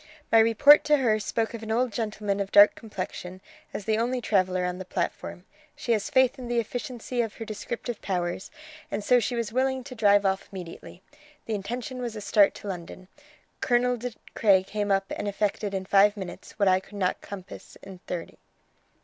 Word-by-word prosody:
My 225 - +7
report 230 +6 +7
to 300 0 +4
her 225 -5 +2
spoke 225 +2 -2
of 230 - -6
an 220 - -7
old 235 +1 +1
gentleman 210 -2 -2
of 195 -1 -3
dark 205 +1 +8
complexion, 185 -3 -7 0.3
as 200 - -6
the 220 0 +1
only 250 +2 0
traveller 185 -5 +1
on 180 0 -3
the - - -4
platform. 180 0 -4 0.3
She 240 - -3
has 220 +3 +1
faith 260 -3 +3
in 250 - -6
the 240 0 -1
efficiency 245 +1 -3
of 225 -2 -4
her 225 - -7
descriptive 230 +2 -5
powers, 180 -1 -2 0.4
and 210 - -3
so 245 +4 +5
she 240 +2 -2
was 230 -2 -3
willing 260 0 0
to 260 +1 -9
drive 205 -3 +4
off 190 0 0
immediately. 180 -4 -9 0.4
The 225 - -3
intention 245 +5 -4
was 235 -2 -4
a 210 - -6
start 205 0 +4
to - - -9
London. 185 0 -7 0.5
Colonel 245 0 +2
De 245 0 -5 0.2
Craye 195 -4 +4
came 205 +1 -3
up 195 0 +2
and 205 - -4
effected 205 0 -1
in 190 -1 -3
five 200 +2 +4
minutes 190 -3 -8
what 200 -2 +2
I 185 0 +5
could 205 +2 -13
not 185 -2 0
compass 195 -2 -10
in 190 -2 -10
thirty." 175 -2 -6
210 Hz, 195 wpm, -26 LUFS, 195-240 Hz, 0.5 s, dark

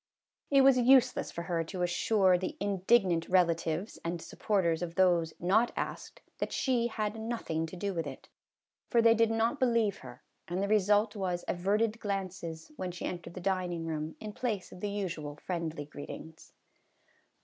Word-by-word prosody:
It 275 -1 +6
was 265 -1 +6
useless 250 0 +4
for 170 - -5
her 170 -1 -1
to 180 +2 -3
assure 185 +2 +3
the 185 +1 -3
indig 200 +2 +3
nant 165 -2 -1
relatives 175 +1 +1
and 170 +1 -2
supporters 170 -2 0
of 170 -1 -4
those 175 -3 +3
not 210 +7 +3
asked - - -5 0.2
that - - -2
she 245 -3 +1
had 215 -1 -3
nothing 220 -8 -2
to 160 - -9
do 200 +2 -2
with 165 -4 -2
it, 135 - -9 0.6
for 235 - +3
they 230 0 +6
did 230 0 +3
not 225 +5 +1
believe 230 -6 +2
her, 125 -1 -12 0.2
and 180 +2 -1
the - - 0
result 210 +1 +3
was 180 -3 -2
averted 210 +5 0
glances, 190 - -4
when 185 -1 -3
she 175 - -6
entered 175 -1 -6
the - - -5
dining 180 -3 -1
room, 155 -1 -3
in 215 -1 -7
place 215 -6 -3
of - - -11
the 205 - -2
usual 170 -8 -4
friendly 165 -2 -4
greetings. 155 +2 -10
185 Hz, 170 wpm, -31 LUFS, 170-220 Hz, 0.6 s, It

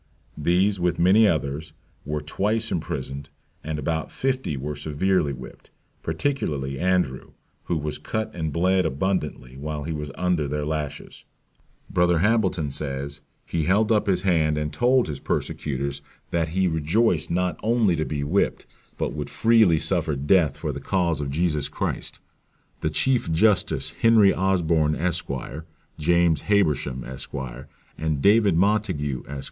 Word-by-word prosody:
These, 90 +6 +2
with 85 -1 +1
many 100 +5 +5
others, 75 -2 -2 0.3
were 75 +1 -2
twice 105 +9 0
imprisoned, 70 +1 -4 0.3
and 80 0 -3
about 80 +2 -2
fifty 130 - -1
were 75 +3 -4
severely 75 +2 0
whipped, 65 -1 -10 0.3
particularly 80 - -2
Andrew, 90 -8 0 0.3
who 85 - 0
was 75 0 -3
cut 110 +7 -3
and 80 -3 -3
bled 95 +4 +2
abundantly, 75 -5 -2
while 75 +1 -4
he 80 - -4
was 75 -1 -4
under 90 -5 0
their 75 +1 -2
lashes; 75 -2 -5 0.6
Brother 90 -1 +2
Hambleton 95 -6 +1
says, 70 0 -5 0.2
he 80 -3 -1
held 105 +5 +3
up 105 -2 +2
his 90 -2 +1
hand, 80 -5 +2
and 75 0 -2
told 125 0 +3
his 75 -3 -5
persecutors 70 -1 -3 0.3
that 85 -2 +1
he 95 +3 +1
rejoiced 80 +3 +1
not 90 +1 0
only 110 -5 +2
to 80 - -1
be 75 -2 -3
whipped, 90 +8 0 0.3
but - - -2
would 75 -1 -5
freely 105 +1 +4
suffer 75 0 0
death 75 +2 +2
for - - -3
the - - -6
cause 85 -6 0
of 70 - -3
Jesus 75 -1 0
Christ. - - -3 0.6
"The 75 - 0
chief 120 +4 +1
justice 100 +4 +2
Henry 110 -4 +6
Osborne, 85 -5 +2
Esq.; 90 +1 -2 0.7
James 85 0 +3
Habersham, 75 -10 +1
Esq.; 65 +1 -8 0.6
and 80 -2 -1
David 100 0 +4
Montague, 90 - +1
Esq. 70 0 -5
80 Hz, 145 wpm, -24 LUFS, 75-95 Hz, 0.7 s, Henry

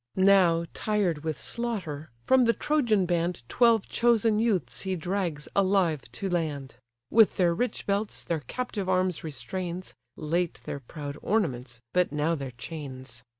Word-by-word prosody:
Now, 185 -3 +5
tired 195 -8 0
with 155 -3 -2
slaughter, 185 - -4 0.2
from 260 -1 +5
the 230 - +4
Trojan 235 -12 +2
band 170 -7 -1
Twelve 230 - +4
chosen 225 -2 +3
youths 195 - 0
he 190 -1 -1
drags 175 -3 -2
alive 185 -6 +3
to 195 - -3
land; 155 -7 -2 0.4
With 225 -2 +5
their 175 -2 +3
rich 245 +8 -2
belts 200 +1 -1
their 165 -2 -1
captive 220 -7 -3
arms 185 -2 +1
restrains 170 +6 -5 0.2
(Late 170 +3 -1
their 140 - -4
proud 145 +2 -7
ornaments, 130 - -1
but 180 -4 +2
now 150 +3 +1
their 140 -4 -4
chains). 130 -2 -8
175 Hz, 145 wpm, -28 LUFS, 150-205 Hz, 0.4 s, Now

